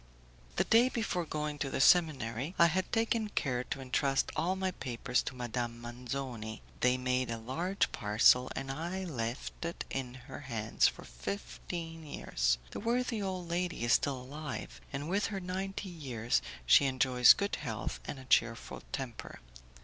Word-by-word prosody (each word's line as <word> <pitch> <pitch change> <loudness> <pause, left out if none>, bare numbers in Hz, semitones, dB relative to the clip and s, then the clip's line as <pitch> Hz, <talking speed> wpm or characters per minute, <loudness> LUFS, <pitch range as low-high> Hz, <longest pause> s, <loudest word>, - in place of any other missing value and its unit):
The - - +3
day 235 +3 +5
before 220 -8 -1
going 150 -1 -3
to 140 - -1
the - - -2
seminary, 145 -2 +3
I 170 - +7
had 180 +3 +1
taken 225 -1 +1
care 125 -10 0
to 135 - -4
entrust 135 +1 +1
all 180 +3 +1
my 190 0 -1
papers 125 -5 -1
to 130 - -5
Madame 120 -1 -3
Manzoni. 120 -2 -5 0.2
They 125 0 +3
made 125 0 0
a 115 - -2
large 165 - -1
parcel, 110 +4 +4
and 135 0 -3
I 170 +6 -3
left 125 -6 -4
it 170 0 -4
in 130 -2 -3
her - - -8
hands 115 -6 +1
for - - -4
fifteen 165 - -6
years. - - 0
The - - -5
worthy 240 -1 0
old 185 -3 -3
lady 175 -6 -1
is 120 - +4
still 140 -3 +2
alive, 145 +3 -6
and 140 +1 -4
with 195 +4 +1
her 200 -3 -3
ninety 190 +2 -4
years 125 - -1 0.2
she 100 - +7
enjoys 130 -2 +6
good 200 0 -2
health 110 -4 -4
and - - -5
a 130 - -10
cheerful 115 -2 +1
temper. 130 -4 -5
135 Hz, 165 wpm, -32 LUFS, 125-180 Hz, 0.2 s, I